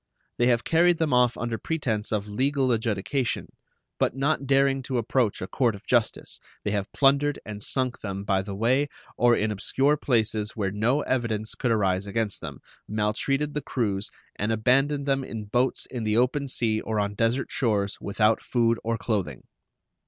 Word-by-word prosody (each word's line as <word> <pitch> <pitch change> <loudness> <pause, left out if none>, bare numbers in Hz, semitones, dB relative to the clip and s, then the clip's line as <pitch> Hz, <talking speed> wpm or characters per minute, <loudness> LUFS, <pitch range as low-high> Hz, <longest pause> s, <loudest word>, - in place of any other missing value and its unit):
They 120 - +4
have 120 -2 +3
carried 170 +1 +4
them 160 -4 0
off 125 -1 +3
under 120 -2 -3
pretense 115 -10 -2
of 105 -2 0
legal 130 +4 +1
adjudication, 115 +3 -1 0.5
but - - +1
not 140 0 0
daring 135 0 +3
to 130 0 -3
approach 115 -3 0
a - - -4
court 115 +2 +1
of 100 - -13
justice, 120 -3 0 0.2
they 105 - -1
have 100 -1 -2
plundered 140 +1 +3
and 105 -1 -7
sunk 130 +2 -1
them 100 -1 -5
by 95 -1 +1
the 100 0 -6
way 125 +7 +2 0.3
or 120 -1 +4
in 110 0 0
obscure 135 +8 +1
places 110 -5 0
where 100 -4 -1
no 115 +8 +1
evidence 110 -5 -1
could 125 - -1
arise 100 -3 +1
against 105 0 -2
them, 70 -5 -7 0.3
maltreated 120 +8 0
the 150 - -2
crews, 105 -7 -1 0.3
and 105 +2 -1
abandoned 135 +6 +2
them 135 -1 +1
in 110 -4 -6
boats 125 +5 0
in 125 -3 -5
the 110 0 +1
open 130 +4 +1
sea 110 -4 +1
or 110 -1 -2
on 100 0 -1
desert 115 +5 0
shores 100 -5 0
without 105 +2 +2
food 115 -2 +1
or 115 0 -1
clothing. 100 - -2
115 Hz, 175 wpm, -26 LUFS, 105-135 Hz, 0.5 s, They